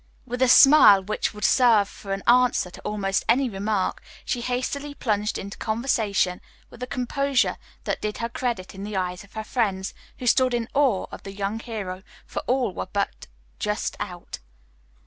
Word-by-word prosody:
With 245 0 -5
a 260 - +5
smile 250 -7 +8
which 215 +3 -2
would 210 -1 -10
serve 230 -6 +5
for 200 -1 -10
an 195 0 -2
answer 245 -6 +3
to - - -12
almost 195 -2 -1
any 250 +1 +3
remark, 200 0 -1 0.2
she 245 - -2
hastily 265 +4 -3
plunged 210 -4 -1
into 200 0 -7
conversation 220 -5 0 0.3
with - - -14
a 250 - -3
composure 275 +1 0 0.3
that - - -2
did 210 0 -3
her 230 - -2
credit 235 -5 -3
in 195 0 -8
the 205 -1 -4
eyes 180 0 -3
of 200 - -20
her 220 - -4
friends, 200 -5 -1 0.2
who 250 - -7
stood 255 0 +3
in 235 -1 -2
awe 270 -9 +2
of - - -9
the 195 - -8
young 200 +2 -3
hero, 205 -6 -5 0.2
for - - -4
all 250 -6 +1
were - - -5
but 200 -1 -2 0.3
just 210 0 -2
out. 180 -3 -6
215 Hz, 180 wpm, -24 LUFS, 195-250 Hz, 0.3 s, smile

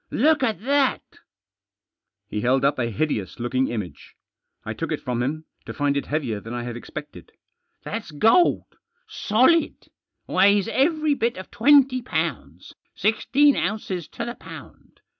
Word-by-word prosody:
Look 305 +4 +2
at 220 -7 -1
that! 275 +2 +1 0.7
" 100 0 -64
He 105 - -2
held 130 +3 +2
up 140 -1 +1
a 120 -2 0
hideous 110 -4 -2
looking 130 +2 0
image. 95 -11 -7 0.5
I - - -4
took - - -5
it - - -1
from 125 -1 -3
him, 155 +5 -3 0.2
to - - -7
find 145 -1 0
it 140 - -2
heavier 135 -9 -2
than 115 +3 -8
I 120 - -4
had 120 -1 -6
expected. 150 +5 -9 0.5
"That's 225 -5 -5
gold 225 - +2 0.3
— - - -47 0.2
solid. 260 +10 +3 0.4
Weighs 200 +1 +3
every 305 +4 +1
bit 235 -5 -1
of 185 - -9
twenty 265 +1 +4
pounds, 240 - -4 0.2
sixteen 275 +6 +3
ounces 185 -4 -3
to 235 - -6
the 240 - -4
pound. - - -13
185 Hz, 155 wpm, -23 LUFS, -, 0.7 s, twenty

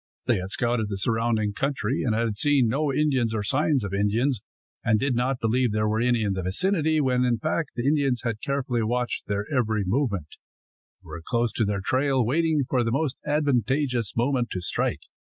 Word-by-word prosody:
They - - +2
had 95 0 -4
scouted 120 -1 0
the 100 - -3
surrounding 110 0 0
country 135 0 -1
and 115 -4 +1
had 115 -2 0
seen 140 +1 +3
no 140 +5 0
Indians 130 -6 +1
or 105 - -1
signs 140 +2 +1
of 100 -1 -4
Indians, 105 +5 +1 0.4
and 110 -2 +2
did 135 +2 0
not 125 +2 0
believe 120 +1 +1
there 105 0 0
were 110 +1 0
any 120 -2 +2
in 100 -2 0
the 95 - -3
vicinity, 160 - +1
when 130 -3 +2
in 120 -2 +2
fact 155 +1 -2
the 120 -1 -3
Indians 140 -4 +1
had 115 -3 -3
carefully 135 -4 -1
watched 120 +2 -2
their 100 0 -1
every 110 -4 +1
movement, 100 - -1 0.7
and - - -18
were 85 - -7
close 120 +3 0
to 110 - 0
their 100 -1 -1
trail, 130 +3 +1
waiting 155 +3 +1
for 125 -3 +1
the 115 - -1
most 140 +1 0
advantageous 135 -4 0
moment 120 0 +1
to 90 - -3
strike. 90 - -1
120 Hz, 195 wpm, -25 LUFS, 110-140 Hz, 0.7 s, seen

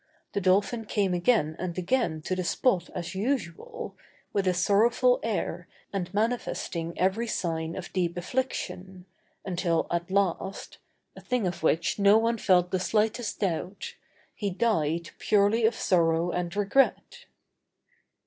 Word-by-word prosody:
The 200 - -1
dolphin 200 +5 +2
came 200 -3 0
again 175 -4 +2
and 180 -1 -4
again 180 -5 0
to 185 - -1
the 185 - -2
spot 180 -1 +1
as 170 - -4
usual, 205 -4 -3 0.4
with 195 -2 0
a 185 - +3
sorrowful 235 - +3
air - - -3 0.3
and 180 -3 -3
manifesting 205 -6 -2
every 195 +6 +1
sign 165 -5 -2
of 185 - -7
deep 175 -2 -1
affliction, 185 -4 -4 0.4
until 175 -3 0
at 170 +1 -1
last 195 0 -1 0.4
(a - - -11
thing 250 -5 -1
of 180 -1 -3
which 160 +5 +1
no 200 +1 +6
one 230 0 +1
felt 180 -2 +3
the 185 - +1
slightest 220 +4 0
doubt), 185 0 -2 0.4
he 205 - -2
died 170 -6 0
purely 215 +2 +3
of 225 - -1
sorrow 170 -2 +2
and 175 +1 -3
regret. 270 - +1
190 Hz, 140 wpm, -27 LUFS, 175-220 Hz, 0.4 s, no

